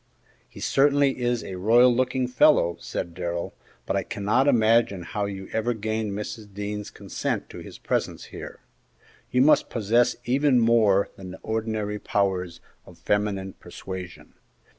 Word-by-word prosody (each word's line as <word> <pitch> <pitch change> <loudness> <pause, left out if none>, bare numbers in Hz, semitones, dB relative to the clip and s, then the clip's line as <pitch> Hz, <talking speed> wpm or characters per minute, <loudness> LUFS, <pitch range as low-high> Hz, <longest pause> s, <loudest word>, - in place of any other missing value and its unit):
"He - - -13
certainly 140 -1 +2
is 120 -1 0
a 95 - -6
royal 120 +5 +5
looking 130 0 0
fellow," 125 - +4
said 85 - -5
Darrell, 85 -1 -4 0.3
"but - - -1
I - - +1
cannot 105 +7 0
imagine 115 -6 +3
how 100 +4 -3
you 95 -1 -6
ever 115 +2 0
gained 110 -1 -2
Mrs. 105 +1 -6
Dean's 105 +1 -5
consent - - -4
to - - -9
his - - -10
presence - - -2
here. - - -9 0.7
You 125 +1 +3
must 155 - +4
possess 115 +2 +2
even 135 +1 +3
more 110 -4 +3
than 95 -1 -9
the 95 - -9
ordinary 110 -2 -2
powers 95 -5 -1 0.2
of - - -16
feminine 100 -2 -1
persuasion." 90 -3 -9
105 Hz, 145 wpm, -25 LUFS, 95-120 Hz, 0.7 s, royal